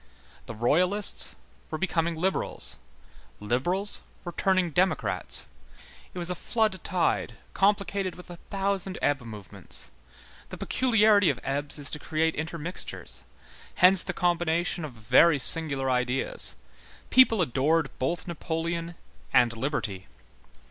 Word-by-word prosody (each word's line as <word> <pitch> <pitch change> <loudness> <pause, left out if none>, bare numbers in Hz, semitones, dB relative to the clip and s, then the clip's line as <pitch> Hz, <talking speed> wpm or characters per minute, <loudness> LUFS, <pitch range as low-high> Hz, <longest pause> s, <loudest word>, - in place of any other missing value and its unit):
The 115 - -7
Royalists 180 - +2 0.3
were 155 - -3
becoming 170 -2 -1
liberals, 185 - -1 0.6
liberals 175 - -1 0.2
were 175 - -4
turning 185 0 +1
democrats. 185 +4 +1 0.7
It - - -7
was 175 0 0
a - - +1
flood 215 +1 -1
tide 180 -2 0 0.2
complicated 200 -1 0
with 180 - -12
a 175 - -9
thousand 195 -1 -2
ebb 145 -2 +1
movements; 110 -5 -5 0.6
the - - -8
peculiarity 215 -6 +3
of - - -1
ebbs 140 +2 -1
is 145 -1 -5
to 150 - -3
create 160 +1 0
intermixtures; 165 +3 -4 0.5
hence 185 0 +8
the - - -2
combination 175 -1 0
of 145 - -9
very 120 +8 +4
singular 140 -1 +1
ideas; 125 +1 -1 0.6
people 255 -4 +6
adored 155 +1 +1
both 170 +8 -2
Napoleon 170 0 -3 0.4
and 120 -1 +4
liberty. 115 -7 -3
170 Hz, 120 wpm, -27 LUFS, 145-185 Hz, 0.7 s, hence